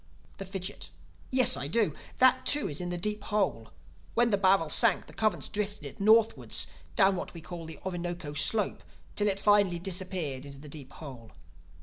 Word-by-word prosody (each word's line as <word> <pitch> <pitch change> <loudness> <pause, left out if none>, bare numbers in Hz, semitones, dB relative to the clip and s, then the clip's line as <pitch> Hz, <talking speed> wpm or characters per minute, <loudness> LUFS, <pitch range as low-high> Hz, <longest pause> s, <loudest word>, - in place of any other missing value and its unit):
The 195 - -6
Fidgit: 190 0 -6 0.4
"Yes, 255 -2 +4
I 140 - -3
do. 200 -1 +1 0.2
That 260 0 +5
too 290 +2 +5
is 145 +3 -4
in 175 - -4
the 175 - -3
Deep 210 +3 -2
Hole. 195 - -1 0.4
When 235 0 +3
the - - +4
barrel 190 -4 +3
sank 225 +4 +3
the - - -14
currents 215 -1 0
drifted 205 -6 -4
it 140 - -8
northwards 220 +2 +3 0.3
down 195 -2 +4
what 180 - -6
we 165 - -8
call 170 0 -8
the 160 -2 -9
Orinoco 175 -4 -4
Slope, 210 +7 +2 0.3
till 210 - +1
it 195 -1 0
finally 205 -4 +3
disappeared 175 -6 -3
into 140 -1 -10
the 145 +2 -11
Deep 140 -2 -8
Hole. 130 -7 -11
190 Hz, 185 wpm, -29 LUFS, 160-210 Hz, 0.4 s, That